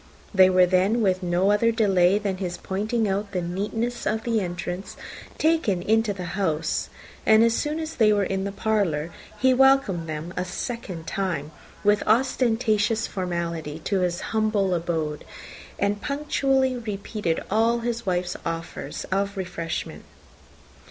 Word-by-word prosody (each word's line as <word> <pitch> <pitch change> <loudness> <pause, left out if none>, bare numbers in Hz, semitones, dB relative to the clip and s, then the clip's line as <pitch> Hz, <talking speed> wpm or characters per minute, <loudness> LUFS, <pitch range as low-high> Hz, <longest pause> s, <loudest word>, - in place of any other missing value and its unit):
They 190 -1 +7
were 185 -1 +5
then, 190 +6 +2
with 185 -1 +2
no 180 +2 +2
other 230 +3 +3
delay 195 -4 +3
than 200 -2 -2
his 180 -2 -4
pointing 215 +4 -1
out 200 +1 -2
the 180 - 0
neatness 215 +7 -3
of 220 +1 0
the 230 -2 +1
entrance, 175 +1 -5 0.4
taken 310 - +1
into 225 +1 +2
the 185 -3 -5
house; 165 -5 -1 0.3
and 220 +1 +6
as 230 0 +4
soon 300 +6 -1
as 320 0 -4
they 220 -3 +4
were 205 -1 +2
in 190 0 -1
the 200 - -3
parlour, 195 -7 0 0.3
he 260 +4 +4
welcomed 255 -11 +3
them 155 +3 -5
a 180 - -1
second 185 -2 -5
time, 170 -7 -2 0.3
with 205 0 +4
ostentatious 225 -2 +2
formality, 170 -4 -3
to 200 -2 +1
his 180 -1 -1
humble 215 -3 +1
abode, 160 -3 -2 0.5
and 205 +1 0
punctually 270 -2 +1
repeated 210 -6 -3
all 230 +3 +2
his 235 0 -2
wife's 180 -1 -1
offers 165 0 -5
of 200 +1 0
refreshment. 170 -3 -4
200 Hz, 145 wpm, -25 LUFS, 180-225 Hz, 0.5 s, They